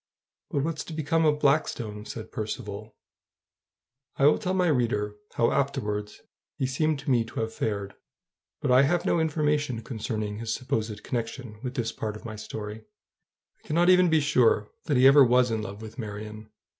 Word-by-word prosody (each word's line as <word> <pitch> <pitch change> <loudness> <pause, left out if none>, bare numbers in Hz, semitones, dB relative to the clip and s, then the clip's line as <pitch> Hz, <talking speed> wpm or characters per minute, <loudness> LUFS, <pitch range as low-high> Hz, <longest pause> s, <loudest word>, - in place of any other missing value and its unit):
"But 140 - 0
what's 160 0 -2
to 165 - -8
become 160 +1 +1
of 150 -1 +3
Blackstone?" 120 -8 0
said 110 -1 -7
Percivale. 110 -1 -5 1.2
I 135 - +3
will 150 - +5
tell 185 -2 -1
my 180 -1 +2
reader 115 -9 +1 0.2
how 115 - +3
afterwards 105 -7 -2 0.4
he 130 - 0
seemed 155 +4 0
to 140 0 -2
me 120 -2 +4
to 115 - -5
have 110 0 -3
fared; 100 -3 -3 0.7
but 140 - +1
I 125 +1 +7
have 165 +5 +2
no 170 - +2
information 150 -6 0
concerning 110 -3 -4
his 115 -1 -3
supposed 110 -5 -3
connection 115 -2 -4
with 130 0 -5
this 115 -4 -1
part 110 -2 -4
of 105 - -11
my 110 -1 -6
story. 105 0 -7 0.8
I - - -20
cannot 170 +4 +4
even 180 -1 +5
be 160 -1 +4
sure 125 -7 +3
that 145 - +1
he 130 - +5
ever 140 +1 +9
was 125 -1 +4
in 110 -1 -1
love 100 +1 -7
with 110 +4 -10
Marion. 105 0 -7
120 Hz, 180 wpm, -27 LUFS, 110-145 Hz, 1.2 s, ever